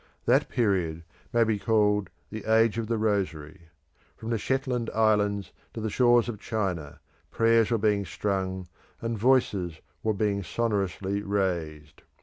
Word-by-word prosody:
That - - +3
period 90 -8 0 0.3
may 120 -1 +4
be 110 -2 0
called 105 -3 +2 0.2
The 110 0 -6
Age 115 0 +3
of 110 - -3
the 115 0 0
Rosary. 85 -7 -2 0.5
From 115 +1 -5
the 115 - 0
Shetland 130 -1 -1
Islands 105 -3 +2 0.2
to - - -4
the 110 -1 -3
shores 120 0 +4
of 110 -4 -5
China, 95 -10 -3 0.3
prayers 115 -1 +3
were 115 - +2
being 105 -2 +1
strung, 95 -2 -2 0.3
and 115 0 -2
voices 100 -8 +1 0.2
were 110 -1 0
being 100 0 0
sonorously 100 -1 -1
raised. 85 -7 -2
105 Hz, 140 wpm, -27 LUFS, 95-115 Hz, 0.5 s, may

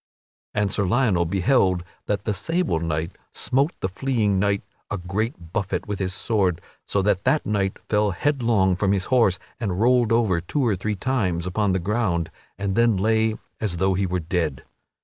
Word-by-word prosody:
And 105 -2 +1
Sir 100 -1 0
Lionel 100 -5 +2
beheld 95 0 +2 0.2
that 100 -1 -1
the 105 - +1
sable 165 - 0
knight 80 +1 -2 0.2
smote 140 +5 0
the - - +1
fleeing 105 -1 0
knight 100 0 +1 0.3
a 105 - -2
great 90 -1 -4
buffet 100 -4 -2
with 105 -2 -3
his 95 -1 -1
sword, 95 -4 0 0.3
so 100 - +1
that 100 -2 +1
that 155 - +2
knight 100 -2 0
fell 105 -1 +2
headlong 110 -4 +2
from 100 +2 +1
his 95 -2 0
horse 115 -7 +4 0.2
and 100 -6 -2
rolled 120 0 +3
over 110 -7 +2
two 130 - -1
or 110 -4 +2
three 105 +3 -2
times 95 -7 -1
upon 95 +2 0
the - - +2
ground 90 -4 0 0.3
and 100 0 -2
then 115 -3 +4
lay 110 +2 +2 0.2
as 100 -6 -2
though 95 +2 +2
he 95 +1 0
were 90 0 -1
dead. 80 -5 -2
100 Hz, 180 wpm, -24 LUFS, 90-110 Hz, 0.3 s, horse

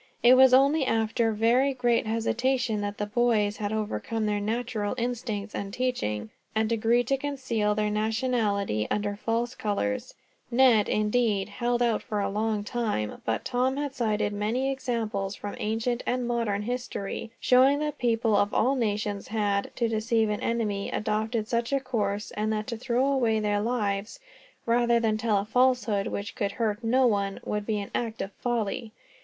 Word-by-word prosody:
It 240 +1 +8
was 260 0 +7
only 275 +4 +5
after 225 -1 +1
very 240 +5 +2
great 240 -3 +1
hesitation 230 0 0
that 205 0 -4
the 210 - -1
boys 210 -2 +1
had 205 -1 -3
overcome 220 +1 -2
their 210 -1 0
natural 220 0 -2
instincts 230 -4 -3
and 195 0 -4
teaching, 110 - -2 0.2
and 220 +1 +1
agreed 230 +2 +2
to 275 - +3
conceal 255 -7 -1
their 210 0 0
nationality 215 - 0
under 205 -1 -1
false 230 +3 -1
colors 150 - -2 0.3
Ned, 240 -4 +4
indeed, 210 -2 +1
held 240 +3 0
out 230 -3 +1
for 210 -4 -3
a 200 -1 -1
long 215 0 -1
time; 210 - -2
but 115 0 -1
Tom 260 +2 0
had 285 -2 -2
cited 215 -4 0
many 230 +6 0
examples, 225 -7 -2
from 205 - -6
ancient 225 +3 -1
and 250 -1 0
modern 230 -4 -1
history, 240 -3 -4
showing 260 +3 +5
that 300 -1 -3
people 230 -2 +2
of 205 +1 +1
all 255 +4 +3
nations 210 -5 -2
had, 205 -2 0
to 235 - +1
deceive 225 0 +1
an 210 - -3
enemy, 215 -4 -1
adopted 215 +1 -1
such 235 +1 -1
a 275 - +2
course; 210 -6 -2
and 215 +1 -1
that 215 -1 -1
to 235 - -4
throw 245 +2 0
away 245 -6 +2
their 205 -1 0
lives, 210 - -2 0.5
rather 235 0 +3
than 220 -2 +1
tell 215 -1 +1
a 200 - -1
falsehood 245 -3 +2
which 205 +2 -4
could 200 -2 -2
hurt 220 -1 -1
no 255 +3 +3
one, 200 -4 0
would 210 0 -3
be 215 -2 0
an 200 -1 -5
act 230 -2 -2
of 195 - -7
folly. 230 0 -3
225 Hz, 170 wpm, -27 LUFS, 210-245 Hz, 0.5 s, It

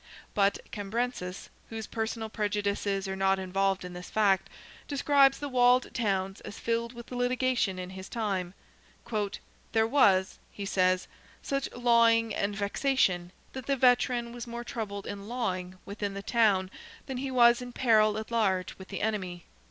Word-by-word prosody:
But 200 -1 +3
Cambrensis, 205 -2 -3 0.2
whose 225 -1 -5
personal 225 0 -3
prejudices 205 -2 -1
are 190 - -3
not 195 0 +2
involved 190 0 0
in 180 - -7
this 180 0 -8
fact, 195 -3 +2 0.4
describes 280 -1 +4
the 290 - -4
walled 250 -1 +3
towns 195 -4 -1
as - - -9
filled 230 +1 -1
with 235 0 -11
litigation 250 -5 0
in 185 0 -6
his 190 0 -9
time. 195 -5 -2 1.2
"There 220 -1 +4
was," 200 -7 +3
he 200 - -6
says, 185 -2 +2 0.4
"such 275 -1 -2
lawing 230 -2 +4
and 200 0 -1
vexation, 200 -4 +1 0.2
that 260 -1 -7
the 275 - +2
veteran 245 -1 +3
was 240 0 -7
more 235 0 -5
troubled 205 -4 -5
in 200 0 -6
lawing 185 -7 -3
within 200 -1 -4
the 200 - -5
town 200 -5 +2 0.3
than 265 - -5
he 270 +1 -3
was 240 -1 +5
in 245 0 -7
peril 215 -4 +3
at 220 +1 -6
large 195 -5 +1
with 190 - -10
the 195 - -5
enemy." 185 -5 -2
215 Hz, 155 wpm, -29 LUFS, 195-240 Hz, 1.2 s, was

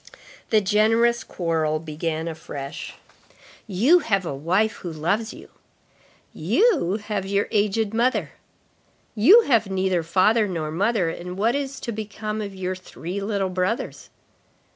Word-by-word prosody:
The 215 -1 +4
generous 225 +4 +3
quarrel 160 -3 -1
began 160 +1 -4
afresh. 145 -3 -7 0.7
"You 235 - +4
have 195 - 0
a 155 - -3
wife 185 +10 0
who 175 - -6
loves 190 +8 -1
you."—"You 335 - -2
have 210 -3 -2
your 200 +1 0
aged 210 +1 +1
mother."—" 240 +3 +1 0.8
You 350 - +7
have 230 - +2
neither 190 -2 0
father 205 +6 +3
nor 160 -5 -3
mother, 195 0 +1
and 180 +2 -7
what 225 +4 +2
is 275 -1 -3
to 235 - -4
become 215 0 -5
of 200 -2 -6
your 185 0 -3
three 185 +1 -7
little 200 -2 -1
brothers?" 185 +5 -2
200 Hz, 130 wpm, -23 LUFS, 175-220 Hz, 0.8 s, You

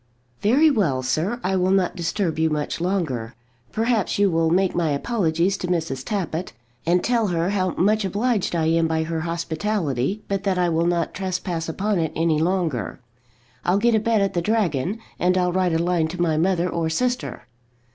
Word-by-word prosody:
"Very 280 +9 +5
well, 155 - +1
sir; 160 - -1
I 190 +1 0
will 185 0 +2
not 190 -2 +2
disturb 170 -1 -1
you 160 0 +3
much 150 +1 -2
longer. 155 - -2 0.4
Perhaps 225 -2 0
you 200 -1 +3
will 165 0 +2
make 185 +2 +2
my 170 -2 0
apologies 175 +2 0
to 180 - -4
Mrs. 160 -7 -2
Tappitt, 185 -4 -3 0.3
and 175 +1 +3
tell 235 -3 +2
her 175 0 0
how 185 -3 0
much 215 +3 +2
obliged 205 0 0
I 160 -2 +1
am 165 0 +2
by 160 0 0
her 165 0 -3
hospitality, 170 - -2
but 195 -1 -1
that 195 -2 0
I 180 -1 +2
will 165 +1 +1
not 170 -1 0
trespass 180 -3 -3
upon 200 +3 0
it 160 -2 0
any 160 -2 +2
longer. 165 - -1 0.6
I'll 180 +2 +2
get 235 +3 +3
a 220 - +4
bed 225 -1 +1
at 195 - 0
the 175 - 0
Dragon, 190 - 0 0.2
and 180 +1 +2
I'll 180 -1 +1
write 185 -2 +1
a - - +2
line 170 -1 +1
to 175 +3 -7
my 165 -3 +2
mother 175 +2 +1
or 165 -2 -1
sister." 245 +8 -2
180 Hz, 190 wpm, -23 LUFS, 165-200 Hz, 0.6 s, Very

